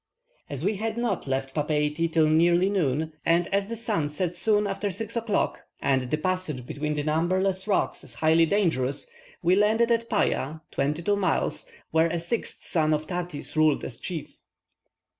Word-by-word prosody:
As 140 +3 -3
we 205 0 +1
had 220 +2 -3
not 235 -10 -1
left 135 0 -2
Papeiti 150 +2 0
till 160 -1 +4
nearly 170 +4 +4
noon, 155 -4 0
and 170 +1 +3
as 200 0 +1
the 230 - -4
sun 215 -10 0
sets 175 +3 -2
soon 210 +2 +3
after 200 +1 -2
six 215 +5 -4
o'clock, 225 -3 0 0.2
and 130 -2 +1
the 155 - +1
passage 160 -7 -2
between 150 +3 -3
the 145 - -1
numberless 185 +5 0
rocks 200 - 0
is - - -9
highly 160 +1 +4
dangerous, 150 -9 +1 0.4
we 175 +2 +4
landed 220 +4 +3
at 230 0 +1
Paya 155 -7 0
(22 150 +8 0
miles), 190 -5 0 0.2
where 160 +1 +4
a 170 +1 -2
sixth 175 +8 -3
son 155 -3 +1
of 150 +1 -4
Tati's 175 -4 -5
ruled 155 -2 +3
as 115 - -5
chief. 170 -5 -6
170 Hz, 170 wpm, -26 LUFS, 150-200 Hz, 0.4 s, till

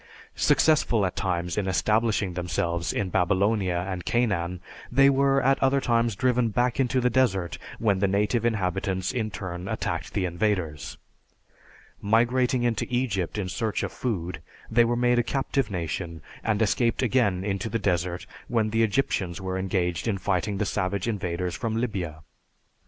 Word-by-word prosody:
Successful 135 -9 +3
at 90 - -3
times 90 0 -1
in 100 - -2
establishing 105 0 +1
themselves 85 -1 -1
in 100 -3 -2
Babylonia 95 0 +1
and 90 -2 -4
Canaan, 95 -7 0 0.3
they 135 +2 +6
were 135 0 +3
at 135 +2 +3
other 135 +1 +3
times 115 -4 +1
driven 125 0 +2
back 120 +4 0
into 130 0 +2
the 125 0 +2
desert 95 - +1 0.2
when 100 -4 +1
the 100 - +2
native 105 +4 +1
inhabitants 95 -4 -1
in 115 -4 -2
turn 95 -2 -6
attacked - - -3
the 95 - 0
invaders. 85 -4 -2 1.0
Migrating 120 +4 +2
into 120 -2 0
Egypt 115 -8 -1
in 100 -3 -2
search 110 +2 -2
of - - -3
food, 90 -8 -3 0.3
they 120 +1 +5
were 120 +1 +1
made 120 0 +3
a - - +2
captive 135 -1 -1
nation 85 -2 -4 0.2
and 110 0 +1
escaped 115 +4 +1
again 105 -7 +2
into 100 +2 -2
the 115 - 0
desert 90 -3 -1 0.2
when 110 -3 0
the 115 +1 +2
Egyptians 100 -6 0
were 95 -1 -3
engaged 90 -1 -1
in 105 -3 0
fighting 95 +2 -1
the 105 - 0
savage 95 +1 -1
invaders 90 -5 -2
from 115 +2 -2
Libya. 90 -10 -3
105 Hz, 155 wpm, -26 LUFS, 90-120 Hz, 1.0 s, they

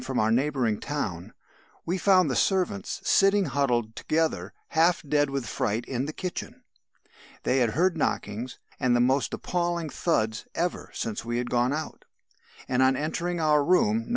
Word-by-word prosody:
from 130 - -3
a 110 +1 +2
neighbouring 125 -4 +1
town, 100 - -4 0.5
we 175 - 0
found 185 -2 +4
the 130 - -1
servants 195 +1 0
sitting 195 0 +4
huddled 125 -5 0
together, 155 - -1 0.2
half 165 +2 +3
dead 145 0 +2
with 135 -2 -3
fright 110 +2 -2
in 130 0 -2
the 155 - -5
kitchen. 180 +1 -6 0.8
They 135 - +2
had 120 -3 +2
heard 175 +7 +2
knockings 120 -5 -2 0.2
and 125 -1 +2
the - - +3
most 130 +3 +2
appalling 175 -2 -2
thuds 110 -10 -1
ever 175 +1 -2
since 110 -2 -3
we 120 +1 -2
had 120 0 -3
gone 125 +1 +2
out; 155 +2 -5 0.6
and 130 0 +1
on 130 0 +4
entering 170 +4 -2
our 150 -2 +3
room 210 +7 +2
(No. - - -11
140 Hz, 165 wpm, -27 LUFS, 120-175 Hz, 0.8 s, found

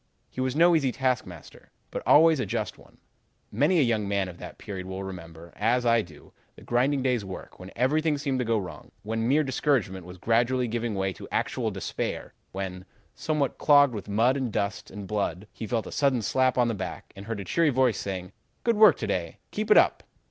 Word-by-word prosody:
He 130 - -4
was 130 0 -1
no 170 +2 +5
easy 140 -5 +2
taskmaster, 125 - -3 0.2
but - - -4
always 160 0 +6
a 130 - 0
just - - -3
one. - - -20 0.5
Many 145 - +2
a 155 - +5
young 110 -4 0
man 100 -2 0
of 85 - -11
that - - -9
period 95 -3 -7
will 95 +1 -5
remember, 85 -3 -9
as 120 +3 +1
I 115 -1 +4
do, 80 -7 -14 0.2
the - - -15
grinding 130 +3 +1
day's 125 -4 +1
work 95 -1 -9
when 90 0 -9
everything 150 +5 +1
seemed 140 -2 -1
to - - +1
go 115 0 +1
wrong, 95 -4 -7
when 115 +2 -2
mere 150 +4 +3
discouragement 120 - -1
was 90 0 -10
gradually 120 +5 +1
giving 115 -1 -2
way 95 -1 -1
to - - -10
actual - - -1
despair, - - -4 0.2
when, 95 -1 -5 0.3
somewhat 150 -4 -1
clogged 145 -3 +5
with 105 -1 -6
mud 115 +6 +3
and 130 -4 -2
dust 100 0 -2
and 100 0 -8
blood, 100 -2 -2
he 110 - -6
felt 115 0 -1
a - - -8
sudden 135 -5 +1
slap 130 +6 +2
on 120 -1 +4
the 115 - 0
back, 95 -3 -6
and 100 +2 -10
heard 115 -2 -3
a 100 - -6
cheery 165 - +2
voice 130 -5 +2
saying, 95 -2 -5 0.3
'Good 235 -2 +2
work 210 -5 +7
to - - -3
day. 85 -3 -3
Keep 215 +1 -3
it 210 - +7
up.' - - +4
115 Hz, 215 wpm, -27 LUFS, 95-135 Hz, 0.5 s, work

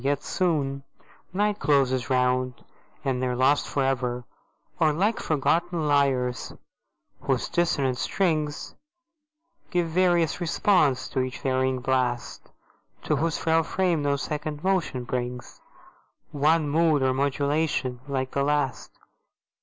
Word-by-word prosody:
yet 140 0 0
soon 145 -7 -1 0.5
Night 205 +2 0
closes 135 -3 +2
round, 125 -1 0 0.4
and 130 -2 0
they 130 - 0
are 125 - -1
lost 135 +3 +2
forever: 125 -3 -1 0.6
Or 155 - +4
like 200 +9 0
forgotten 165 +2 0
lyres, 135 -4 +1 0.7
whose 135 -3 -1
dissonant 140 -7 0
strings 155 -6 -1 1.0
Give 175 -2 0
various 175 -1 +2
response 170 -5 +2
to 135 - -2
each 130 0 -4
varying 130 -1 0
blast, 125 -2 -1 0.5
To 150 - 0
whose 160 +2 0
frail 165 0 +2
frame 175 -1 0
no 145 0 +1
second 150 +1 -4
motion 185 -9 0
brings 125 0 -5 0.7
One 150 +2 +2
mood 155 -1 +2
or 130 0 +2
modulation 140 -1 0
like 130 -2 -2
the 140 - -1
last. 145 -2 -1
145 Hz, 120 wpm, -26 LUFS, 130-160 Hz, 1.0 s, Or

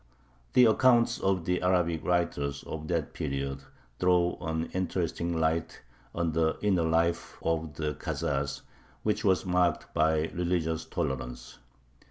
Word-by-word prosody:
The 125 - +7
accounts 120 +1 +4
of 95 -3 0
the 90 0 0
Arabic 90 -3 +1
writers 70 -5 0
of 80 -1 -6
that 85 -3 -1
period 70 0 -3 0.4
throw 90 -1 +3
an 80 0 -2
interesting 85 -2 -1
light 80 +1 -1 0.3
on 85 -1 0
the 80 0 +1
inner 95 -4 +3
life 85 +1 0
of 80 -2 -1
the 75 -1 -2
Khazars, 70 +1 -2 0.4
which 105 0 0
was 95 -2 +2
marked 90 -3 +1
by 80 0 +3
religious 85 -2 -1
tolerance. 60 -1 -4
85 Hz, 130 wpm, -29 LUFS, 80-90 Hz, 0.4 s, The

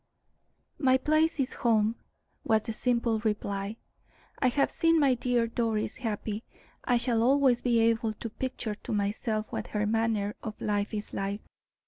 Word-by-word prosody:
"My 260 -3 +4
place 310 +3 +2
is 265 - 0
home," 220 -2 +2 0.5
was 220 -1 +2
the 225 - -4
simple 235 -1 +1
reply. 205 -1 -2 0.6
"I 255 - +3
have 275 +3 +2
seen 330 0 +3
my 275 -3 +4
dear 245 -1 +1
Doris 225 -1 -1
happy. 220 -2 -3 0.4
I 245 - +2
shall 235 -1 +1
always 260 -1 +4
be 240 -2 +2
able 225 -1 +2
to 225 +1 -7
picture 245 -3 -4
to 210 - -6
myself 215 +1 -1
what - - -4
her 210 0 -1
manner 215 -1 0
of 220 -2 -6
life 205 -1 -1
is 215 -1 -5
like. 200 +1 -2
225 Hz, 155 wpm, -29 LUFS, 215-250 Hz, 0.6 s, My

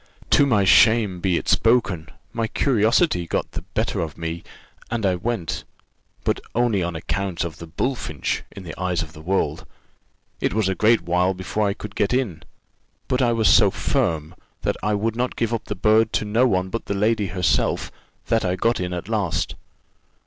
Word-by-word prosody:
"To 145 - +5
my 105 -7 +3
shame 110 -2 +5
be 90 -1 +1
it - - -5
spoken; 110 -9 +2 0.2
my 115 -1 -1
curiosity 110 - +2
got - - -2
the - - -5
better - - -2
of 80 -2 -4
me, 85 0 -4 0.5
and 115 -2 -1
I 95 - +3
went 90 -1 -3 0.6
but - - 0 0.2
only 115 -5 +2
on 85 -1 -2
account 90 +2 -2
of 85 -2 -6
the 85 - -8
bullfinch 80 - -2
in 100 - -10
the 85 - -7
eyes 90 -2 0
of 80 0 -11
the 75 - -11
world. 95 +4 -1 0.7
It - - -1
was 110 -3 +2
a 95 - +1
great 110 +2 +3
while 90 +2 +1
before 95 +3 -1
I 100 - -1
could 105 - -8
get 105 +4 +1
in: 105 -12 -1 0.7
but 130 0 +1
I 120 -2 +3
was 115 -2 +2
so - - +6
firm, 80 +1 -1 0.3
that - - 0
I 105 0 +1
would 110 +2 -1
not 125 +1 -1
give 115 0 -1
up 115 - -2
the 105 - -4
bird 110 +3 +3
to - - 0
no 115 +5 +3
one 95 -4 0
but 115 - -4
the 100 - -2
lady 105 0 +1
herself, 90 -2 0 0.3
that 115 -1 +1
I 90 -1 0
got 115 +6 +1
in 90 0 -3
at 90 +1 -5
last. 105 -8 -1
100 Hz, 190 wpm, -23 LUFS, 90-115 Hz, 0.7 s, so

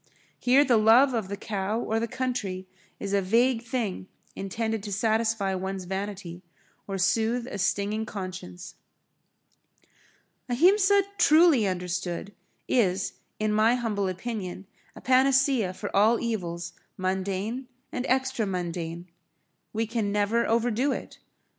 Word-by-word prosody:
Here 265 +4 +5
the 245 -4 +4
love 235 +5 +6
of 220 -5 -1
the 200 +1 -5
cow 205 +1 -2
or 225 -1 -1
the 230 - -1
country 215 -8 -3 0.3
is 200 0 -4
a 200 - +3
vague 230 +5 +2
thing 225 -6 -3 0.3
intended 220 +3 -2
to 205 0 -7
satisfy 220 -1 +1
one's 190 0 -3
vanity, 190 -2 -5 0.5
or 195 -1 -3
soothe 225 +6 +1
a 205 - -6
stinging 205 +3 0
conscience. 185 -2 -7 1.8
Ahimsa 385 - +4 0.2
truly 310 - +5
understood 180 +1 -3 0.3
is 195 -6 +1 0.3
in 215 0 +1
my 220 +3 +4
humble 215 -5 -1
opinion 190 -1 -5 0.3
a - - -11
panacea 260 -4 +3
for 185 - -6
all 220 +4 +4
evils 175 -7 -3 0.2
mundane 190 +6 -2 0.2
and 255 0 -3
extra 260 -4 +1
mundane. 175 -2 -4 0.6
We 225 +1 -1
can 220 -2 -2
never 210 +3 +1
overdo 235 +4 +1
it. - - -6
215 Hz, 125 wpm, -27 LUFS, 190-240 Hz, 1.8 s, love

